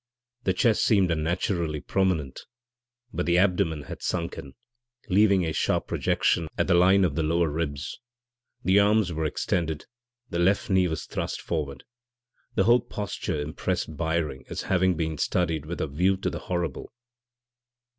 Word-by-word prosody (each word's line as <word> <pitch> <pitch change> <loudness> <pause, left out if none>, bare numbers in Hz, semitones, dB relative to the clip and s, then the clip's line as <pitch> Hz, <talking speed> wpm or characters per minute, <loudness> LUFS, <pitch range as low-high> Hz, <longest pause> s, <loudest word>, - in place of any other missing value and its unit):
The 95 - +2
chest 110 +3 +2
seemed 95 -5 +3
unnaturally 85 0 -1
prominent, 90 -7 -1 0.7
but - - -2
the 85 0 +3
abdomen 90 -5 +2
had - - -8
sunk 85 -1 -2
in, 70 -1 -9 0.6
leaving 100 -2 +4
a 80 - -2
sharp - - 0
projection 85 - +1
at - - +2
the 95 - +2
line 95 +2 +5
of 80 - 0
the 80 - -1
lower 85 +1 +1
ribs. 70 -3 -3 0.6
The 95 +2 +4
arms 100 -3 +3
were 80 0 -2
extended, 80 0 -1 0.4
the 85 - -3
left 100 +5 +2
knee 95 -1 +4
was 80 -2 -4
thrust - - -4
upward. 70 -5 -3 0.7
The 95 - +3
whole 120 +3 +5
posture 100 -8 -4
impressed 80 +2 -3
Byring 80 -4 -2
as - - -4
having 95 -2 +2
been 80 -2 -2
studied 80 -4 0
with 85 - -5
a - - 0
view 90 +7 +1
to 95 - -2
the - - -5
horrible. 85 -5 -3
85 Hz, 155 wpm, -26 LUFS, 80-95 Hz, 0.7 s, line